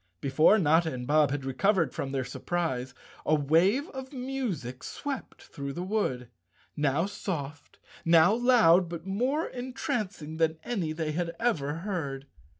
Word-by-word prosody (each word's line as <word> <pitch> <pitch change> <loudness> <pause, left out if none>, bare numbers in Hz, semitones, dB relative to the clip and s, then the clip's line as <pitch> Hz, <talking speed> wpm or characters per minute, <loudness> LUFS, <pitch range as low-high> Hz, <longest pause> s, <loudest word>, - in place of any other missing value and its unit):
Before 155 +9 +4
Notta 160 -2 +3
and 125 -2 -5
Bob 150 +1 +4
had 140 -1 -3
recovered 170 +7 +1
from 135 - -4
their 135 -1 -1
surprise 130 -5 -3 0.3
a 155 - +3
wave 170 - +3
of 265 -1 -8
music 250 - -4
swept 280 -3 -6
through 140 -1 -6
the 175 - -4
wood, 185 - -1 0.5
now 150 +3 +1
soft, 150 -8 -5 0.3
now 165 +3 +6
loud, 220 -8 +5
but 170 0 -6
more 250 +11 0
entrancing 240 - -4
than 160 -1 +1
any 190 -10 -2
they 155 -1 -2
had 170 +1 -2
ever 155 -12 0
heard. 140 -9 -3
165 Hz, 145 wpm, -28 LUFS, 145-215 Hz, 0.5 s, now